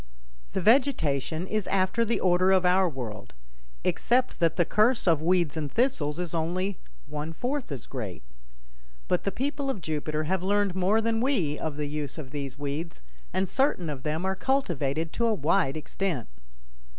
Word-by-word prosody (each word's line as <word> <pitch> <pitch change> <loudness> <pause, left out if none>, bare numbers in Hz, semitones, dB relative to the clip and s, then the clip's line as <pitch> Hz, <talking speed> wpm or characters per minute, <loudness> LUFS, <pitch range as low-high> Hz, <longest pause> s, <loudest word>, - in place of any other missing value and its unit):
The - - 0
vegetation 175 - +2
is 215 0 -1
after 195 +4 +2
the 230 +1 0
order 185 +1 +4
of 185 -1 +4
our 185 0 +4
world, 120 - -7 0.5
except 250 +1 +1
that 165 -1 +3
the 175 - +3
curse 220 +3 +3
of 160 -3 +4
weeds 170 -3 +2
and 150 -3 -3
thistles 165 - +1
is 175 -2 -3
only 180 +4 -1 0.3
one 150 +2 -5
fourth 250 - -3
as 135 -5 -5
great. 110 - -6 0.8
But - - 0
the 200 - +1
people 275 +5 -2
of 265 - -2
Jupiter 155 -1 -2
have 185 +3 0
learned 200 0 +2
more 190 +4 +2
than 225 0 0
we 190 - +1
of 155 -2 -3
the 150 - -1
use 145 -1 -4
of 140 -5 -7
these 140 -2 -5
weeds, 145 - -4 0.3
and 190 0 0
certain 185 - +1
of 135 -3 -6
them 155 +5 -2
are 190 0 0
cultivated 165 - 0
to 235 - +1
a 225 - +2
wide 155 -2 +1
extent. 155 - -2
175 Hz, 175 wpm, -27 LUFS, 150-205 Hz, 0.8 s, order